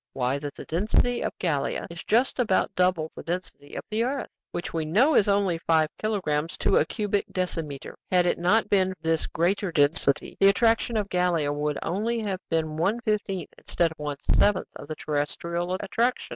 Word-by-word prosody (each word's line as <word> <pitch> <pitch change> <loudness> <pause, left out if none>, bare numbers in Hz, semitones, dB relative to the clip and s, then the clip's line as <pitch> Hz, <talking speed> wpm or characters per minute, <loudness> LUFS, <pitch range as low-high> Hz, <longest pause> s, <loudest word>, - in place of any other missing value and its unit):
Why, 130 +2 0
that 145 -1 -6
the - - -9
density 215 +8 +1
of - - -3
Gallia 150 -6 -1
is 170 - -8
just 245 +4 +1
about 210 -6 +2
double 180 -3 +1
the - - -7
density 175 -4 -6
of - - -4
the 220 +2 +1
earth, 270 +3 -3 0.2
which 175 - -5
we 165 -1 -1
know 220 - +3
is 210 - +4
only 200 -4 +2
five 160 -2 +2
kilogrammes 170 -8 -1
to - - +2
a - - +4
cubic 205 -1 -1
decimeter. 165 -6 -4 0.2
Had 180 -1 +4
it 175 - +1
not 205 +6 +3
been 190 -2 +2
for 170 - -42
this 160 0 +1
greater 185 +3 0
density, 145 -2 +2
the 195 - +6
attraction 225 +2 +2
of 205 -2 0
Gallia 175 -5 +1
would 150 0 -1
only 220 +7 -1
have 195 -3 -2
been 160 -2 -1
one 195 +8 +1
fifteenth 205 -5 -2
instead 170 -2 0
of 160 - -13
one 145 -1 -3 0.2
seventh 205 -3 +3
of - - -9
the 155 - -5
terrestrial 170 +4 -2
attraction." 230 +5 -1
180 Hz, 190 wpm, -26 LUFS, 155-205 Hz, 0.2 s, the